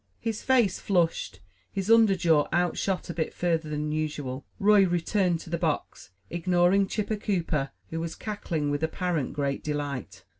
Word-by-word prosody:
His 225 -2 -3
face 240 -8 +3
flushed, 170 - 0 0.3
his 195 +2 -1
under 225 -4 +6
jaw 160 -4 +3
outshot 180 +1 0
a - - -6
bit 160 -1 -3
further 165 -3 0
than 150 0 -2
usual, 150 -4 -3
Roy 205 0 +5
returned 175 0 +1
to 165 - -11
the 170 - -1
box, 155 - -2 0.2
ignoring 180 +3 +3
Chipper 210 +1 -2
Cooper, 165 -9 -1 0.2
who 165 - -2
was 165 0 -4
cackling 170 -9 -3
with 145 +1 -1
apparent 160 -3 -1
great 140 -1 -2
delight. 140 -10 -4
170 Hz, 155 wpm, -27 LUFS, 150-195 Hz, 0.3 s, under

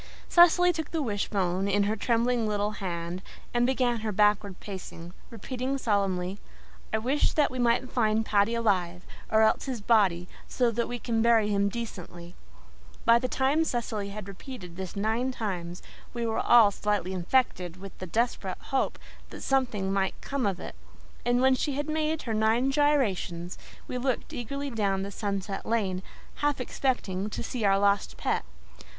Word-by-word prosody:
Cecily 355 +1 +6
took 320 -2 -4
the 325 - -1
wishbone 195 -4 -1
in 200 +1 +2
her 210 +2 0
trembling 235 +1 +1
little 205 0 0
hands 175 -3 -4 0.3
and 240 0 +3
began 250 -3 +1
her 215 0 -2
backward 210 -1 +2
pacing, 180 -3 -8 0.2
repeating 255 +4 -3
solemnly, 195 -5 0 0.5
"I 220 - +2
wish 260 +7 +1
that 300 -2 +2
we 255 - -5
may 235 -1 +3
find 220 -3 +1
Paddy 210 +2 +2
alive, 185 -6 0 0.3
or 220 0 +5
else 220 - +2
his 260 -4 -3
body, 200 -5 +3 0.2
so 245 -2 +1
that 235 +1 -1
we 245 - -4
can 230 -1 -1
bury 225 -2 +4
him 200 0 +2
decently." 180 -6 -7 0.7
By 230 0 +6
the 255 - -1
time 270 +5 +2
Cecily 225 -7 -2
had 205 -1 -7
repeated 195 -3 -9
this 190 -1 -6
nine 220 +5 0
times 180 -7 -4 0.3
we 235 -1 -1
were 225 -1 0
all 230 -4 +6
slightly 205 -2 -1
infected 180 -2 0
with 195 0 -10
the 185 - -5
desperate 215 -2 -1
hope 270 - -1 0.3
that - - -9
something 225 -8 0
might 195 -1 0
come 275 -5 -2
of 190 -2 -2
it; - - -7 0.5
and 245 +1 +2
when 265 0 +6
she 280 +2 -1
had 290 +2 -2
made 310 0 -1
her 230 - -2
nine 220 +5 +2
gyrations 210 - +1 0.3
we 250 - -3
looked 255 -1 -2
eagerly 280 +4 -4
down 200 -4 0
the 200 - -5
sunset 200 -1 -3
lane, 195 -5 0 0.4
half 290 -2 0
expecting 215 -6 -1
to 210 - -5
see 235 0 -4
our 195 0 +4
lost 200 0 +1
pet. - - 0
220 Hz, 170 wpm, -28 LUFS, 195-250 Hz, 0.7 s, Cecily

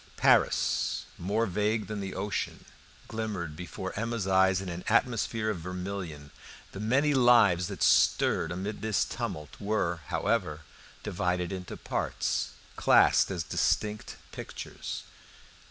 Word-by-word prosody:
Paris, - - +3
more 105 +6 0
vague 105 +2 0
than 105 +2 -5
the 95 -1 -5
ocean, 100 +2 -3 0.4
glimmered 100 -8 -4
before 90 +3 -6
Emma's 115 -1 -2
eyes 95 -1 +4
in 95 - -6
an 85 0 -5
atmosphere 115 -3 +1
of 95 - -4
vermilion. 90 -4 -6 0.4
The 95 - -8
many 135 +8 +2
lives 115 -9 +5
that - - -3
stirred 80 - +3
amid 95 +5 -4
this 110 -2 +1
tumult 75 -1 -5
were, 100 -5 0
however, 95 -9 0 0.4
divided 90 0 -1
into 90 -2 -6
parts, - - -1 0.3
classed - - +5
as 90 -4 -2
distinct 105 +7 -1 0.2
pictures. - - -7
95 Hz, 120 wpm, -29 LUFS, 90-110 Hz, 0.4 s, lives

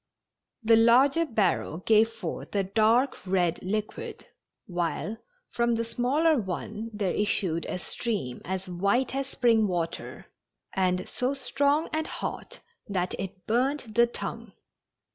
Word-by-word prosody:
The 225 0 +6
larger 270 +8 +5
barrel 195 - +1
gave 220 +4 +4
forth 225 -2 -6
a 200 - +3
dark 225 +7 +3
red 180 -2 +1
liquid, 210 +3 -4 0.4
while 175 +4 -2 0.3
from 235 0 +1
the 230 0 -1
smaller 275 +6 +2
one 210 +3 -4
there 205 -4 -1
issued 180 -5 0
a - - -2
stream 195 - -3
as 190 +1 -4
white 200 +9 +1
as 270 0 -2
spring 230 -5 +3
water, 170 -3 -3 0.5
and 185 -1 +1
so 255 +3 -1
strong 285 +3 +1
and 315 +1 0
hot - - -6 0.3
that 185 -3 -1
it 190 -1 -6
burned 250 +1 0
the 235 +2 +5
tongue. 235 - -6
220 Hz, 130 wpm, -27 LUFS, 185-245 Hz, 0.5 s, The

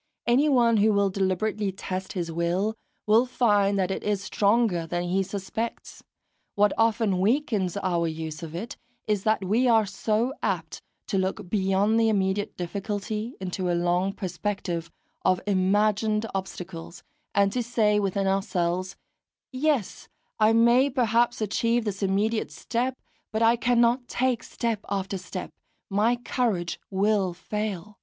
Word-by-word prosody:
Anyone 240 -2 +4
who 215 +1 +4
will 200 -1 +2
deliberately 195 +2 0
test 185 0 -5
his 175 -4 -3
will, 175 +6 0 0.3
will 225 +4 +4
find 205 -5 +2
that 190 -1 0
it - - -3
is 205 -2 -1
stronger 200 -6 +1
than 175 +1 -2
he 180 +2 +1
suspects; 200 +4 -5 0.5
what 205 0 +3
often 225 -4 +2
weakens 205 - +1
our 175 -4 0
use 160 0 -5
of 165 -1 -7
it 215 +7 -6 0.3
is 210 -2 0
that 215 -3 +2
we 230 +7 +2
are 225 -2 +5
so 215 +5 -1
apt - - -2 0.2
to 195 - 0
look 190 +1 -2
beyond 200 +2 +2
the 225 -1 +3
immediate 200 -1 0
difficulty 205 +5 -4
into 185 -1 -3
a 175 - +1
long 175 +2 +1
perspective 180 -3 -3 0.3
of 185 -1 +3
imagined 210 +2 +2
obstacles, 180 -2 -6 0.3
and 200 0 +4
to 250 - 0
say 220 -3 +2
within 195 -1 0
ourselves, 185 -1 -1 0.6
"Yes, 270 -5 -1 0.3
I 215 0 +5
may 235 +4 +5
perhaps 240 -2 +1
achieve 230 +2 +1
this 200 -1 -3
immediate 205 +3 0
step, 250 +2 -2 0.3
but 220 +1 0
I 230 +1 +5
cannot 240 +1 +2
take 250 -2 0
step 230 -3 -2
after 195 -1 -2
step 180 - -6 0.4
my 215 +5 +3
courage 230 -8 -1
will 195 -2 +1
fail!" 210 0 -5
205 Hz, 140 wpm, -26 LUFS, 190-225 Hz, 0.6 s, are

